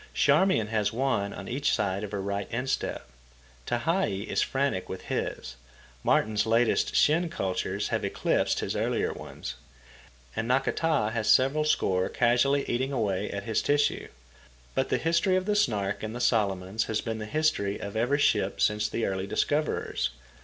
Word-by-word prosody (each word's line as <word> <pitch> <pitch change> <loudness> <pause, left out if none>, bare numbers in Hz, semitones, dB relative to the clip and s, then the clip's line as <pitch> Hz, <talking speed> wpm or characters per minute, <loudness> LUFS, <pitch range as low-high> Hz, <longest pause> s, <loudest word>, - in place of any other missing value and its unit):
Charmian 190 - +3
has 105 -2 0
one 115 -5 0
on 100 - -8
each 140 +4 +1
side 100 -2 -1
of 105 - -5
her 100 -2 -3
right 100 0 -2
instep. 125 +3 -2 0.6
Tehei 120 - 0
is - - 0
frantic 135 -9 -1
with 95 - -6
his. 65 -1 -4 0.5
Martin's 110 0 +2
latest 115 +1 +2
shin 165 +3 +3
cultures 95 - -2
have - - -1
eclipsed - - 0
his - - -2
earlier - - 0
ones. - - -7 0.8
And 115 - -2
Nakata 135 -1 +1
has 110 -2 -1
several 140 +4 +4
score 95 -11 +1
casually 125 +4 +2
eating 130 +3 -1
away 105 -6 -1
at 100 0 -4
his 110 +1 0
tissue. 145 0 +1 0.7
But 130 - 0
the - - +2
history 170 +4 +2
of 185 0 0
the 210 0 +1
Snark 105 - 0
in 110 0 -4
the 120 - -5
Solomons 100 -4 +1
has 110 -1 -1
been 115 -1 -4
the 110 - -5
history 105 -8 0
of 100 +1 -7
every 125 +6 +2
ship 145 - +1
since 105 0 +2
the 115 - -1
early 95 0 -2
discoverers. 145 - 0
115 Hz, 160 wpm, -28 LUFS, 100-140 Hz, 0.8 s, several